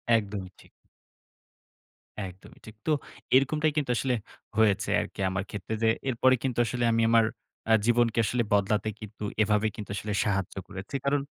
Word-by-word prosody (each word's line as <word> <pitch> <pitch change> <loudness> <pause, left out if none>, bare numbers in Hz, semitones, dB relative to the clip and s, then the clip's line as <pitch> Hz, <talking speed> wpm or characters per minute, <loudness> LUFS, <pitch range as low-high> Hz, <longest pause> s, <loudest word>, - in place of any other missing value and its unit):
একদমই 100 -3 -2
ঠিক। - - -19 1.5
একদমই 95 +3 -12
ঠিক। 110 - -11
তো 155 - +2 0.4
এরকমটাই 150 +3 +3
কিন্তু 140 -4 +1
আসলে 130 -2 +1 0.4
হয়েছে 105 -3 +3
আরকি - - -8
আমার 95 +1 -2
ক্ষেত্রে 105 +2 -5
যে, 110 - +5 0.2
এরপরে 130 +1 +4
কিন্তু 125 -3 -1
আসলে 120 0 -2
আমি 115 - +2
আমার 115 -1 +5 0.5
আ - - +8
জীবনকে 120 -1 +3
কিন্তু 120 -1 +1
বদলাতে 105 +2 +2
কিন্তু 105 0 -9 0.2
এভাবে 105 +1 +2
কিন্তু 105 -1 -7 0.3
সাহায্য 95 -3 -1
করেছি। 95 +8 -7
কারণ 140 0 +2
110 Hz, 150 wpm, -28 LUFS, 100-125 Hz, 1.5 s, আ